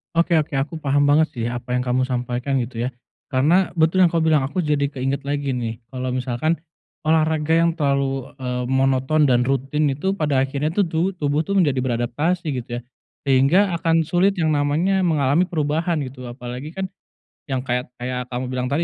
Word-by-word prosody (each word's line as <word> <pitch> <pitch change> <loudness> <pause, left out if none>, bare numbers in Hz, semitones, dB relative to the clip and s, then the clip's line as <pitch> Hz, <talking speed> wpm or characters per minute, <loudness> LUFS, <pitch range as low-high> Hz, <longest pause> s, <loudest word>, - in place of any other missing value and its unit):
Oke 170 0 +3
oke, 150 -2 -3
aku 145 +4 -2
paham 145 -1 +2
banget 145 +2 +4
sih 115 -1 -2
apa 125 0 -3
yang 125 - 0
kamu 130 +1 0
sampaikan, 125 +2 -2
gitu 120 0 -3
ya. - - -2 0.4
Karena 155 +8 +2
betul 165 +3 +3
yang - - -1
kamu 165 -1 +1
bilang, 150 -3 +4
aku 180 +5 -2
jadi 145 -2 +1
keinget 135 0 -3
lagi 145 -1 -1
nih 115 -2 -4
kalau 130 -1 -3
misalkan 130 +6 0 0.5
olahraga 155 0 +2
yang 170 -1 +2
terlalu, 140 -4 0
eee, 125 -1 -2
monoton 135 +3 +2
dan 125 -2 +3
rutin 135 +3 0
itu 190 +9 -1
pada 150 -7 +1
akhirnya 140 +3 -2
tuh 195 0 +1
tubu 165 +4 0
tubuh 150 -4 0
tuh 200 +3 -2
menjadi 145 -7 +2
beradaptasi, 130 +9 -1
gitu 125 -1 -5
ya. - - -12 0.5
Sehingga 155 +9 +4
akan 165 -1 +1
sulit 190 +2 +2
yang 155 -2 +2
namanya 165 +7 +1
mengalami 155 -1 +3
perubahan 160 -1 -1
gitu, 130 -2 -6
apalagi 125 +4 -7
kan 190 +1 -3 0.6
yang 130 -2 -2
kayak 125 -1 -1
kayak 125 0 -4
kamu 125 +1 -4
bilang 125 0 -2
tadi, 145 +6 0
145 Hz, 185 wpm, -22 LUFS, 130-160 Hz, 0.6 s, banget